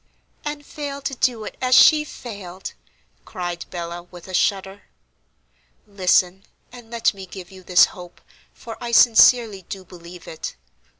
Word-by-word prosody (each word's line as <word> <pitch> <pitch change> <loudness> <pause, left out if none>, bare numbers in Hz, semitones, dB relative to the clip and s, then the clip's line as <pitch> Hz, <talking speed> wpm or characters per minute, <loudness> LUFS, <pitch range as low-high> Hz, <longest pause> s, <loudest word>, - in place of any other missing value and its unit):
"And 295 -1 -5
fail 285 -2 -6
to 275 - -3
do 240 -3 0
it, - - -8
as 255 0 +3
she 305 -1 +7
failed!" 200 -10 -9 0.5
cried 175 -3 -5
Bella, 175 -1 -6
with 175 0 -14
a 185 - -9
shudder. 195 +1 0 1.0
"Listen, 190 -1 +1 0.3
and 240 -2 -13
let 230 -1 +1
me 190 -1 -10
give 185 -1 -10
you 190 -1 -13
this 180 0 +5
hope, 175 -1 -12 0.3
for 225 -1 -10
I 235 0 -4
sincerely 230 -3 +6
do 190 -1 -7
believe 175 0 -13
it. 160 - -7
195 Hz, 145 wpm, -22 LUFS, 180-240 Hz, 1.0 s, she